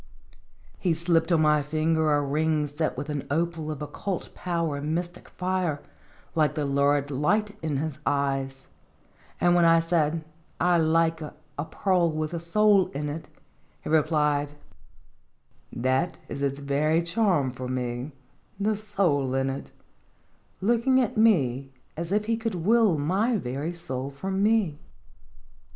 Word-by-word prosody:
He 175 -4 +1
slipped 170 +1 +1
on 160 -2 +4
my 150 -1 +4
finger 155 +1 +1
a 145 0 +2
ring 150 +2 +1
set 150 +1 -2
with 140 +2 -4
an 145 -2 -3
opal 165 +1 -1
of 150 -1 -4
occult 185 +4 -4
power 170 -4 -2
and 150 +3 -2
mystic 175 0 -5
fire, 180 -5 -1 0.5
like 155 -2 +2
the 150 -2 -1
lurid 140 +1 +1
light 205 +10 +1
in 155 -3 -1
his 150 0 -3
eyes; 135 -1 -1 0.7
and 175 0 +4
when 175 -1 +4
I 165 0 +6
said, 165 -1 0 0.2
" - - -37
I 175 -1 +3
like 165 0 +2
'a 150 -1 -7 0.3
pearl 180 -4 +1
with 155 +1 -3
a 170 - -2
soul 195 +3 +3
in 145 +1 -3
it,'" 155 +2 -6 0.5
he - - -5
replied: 150 -2 +2 0.6
" 65 -1 -40 0.2
That 135 +7 +1
is 140 - -6
its 140 -1 0
very 150 +4 +1
charm 170 - +1
for 130 0 -6
me 125 +2 -3 0.5
the 210 +2 +1
soul 180 -11 0
in 135 0 +1
it," 135 - -7 0.9
looking 235 +5 +3
at 245 -4 0
me 140 - +2 0.2
as 170 +2 -5
if 210 +1 +1
he 225 +1 0
could 225 -3 -3
will 205 +1 +3
my 195 +11 +1
very 140 +1 -3
soul 135 -6 -5
from 190 +8 -3
me. 205 -8 +2
160 Hz, 150 wpm, -26 LUFS, 145-180 Hz, 0.9 s, I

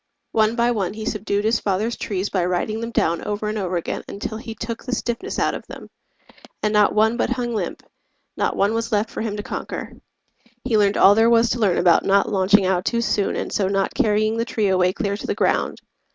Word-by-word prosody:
One 220 +1 +2
by 240 0 +2
one 200 -4 -2
he 220 0 -6
subdued 210 -1 -1
his 220 +1 +2
father's 210 +4 -1
trees 195 -1 -3
By 185 -3 +1
riding 185 +5 -1
them 230 0 -4
down 170 -7 0
over 210 0 -3
and 215 - -3
over 185 -2 -1
again 170 - -4
Until 215 +2 -5
he 225 -1 -8
took 230 0 -5
the 250 -1 -2
stiffness 240 - -3
out - - +1
of - - -7
them, - - -11 0.7
And 210 0 +1
not 210 -1 +4
one 220 +2 +3
but - - 0
hung 240 -2 -2
limp, 195 -6 -4 0.5
not - - -1
one 200 +2 +2
was 230 0 -2
left 210 +1 0
For - - -5
him 215 -2 -3
to 205 - -4
conquer. - - -6 0.7
He 245 -3 0
learned 205 -1 +3
all 200 - +7
there 225 +2 +4
was 235 0 +4
To 245 - -1
learn 195 -6 +2
about 175 -2 +4
not 200 0 +3
launching 195 0 +3
out 185 -1 +1
too 235 -1 0
soon 210 -2 0
And - - -4
so 195 - +1
not 195 0 0
carrying 215 +1 +1
the 230 - +1
tree 215 -4 0
away 185 -1 +3
Clear 200 +1 -2
to - - -7
the - - -1
ground. - - 0
210 Hz, 230 wpm, -22 LUFS, 195-230 Hz, 0.7 s, all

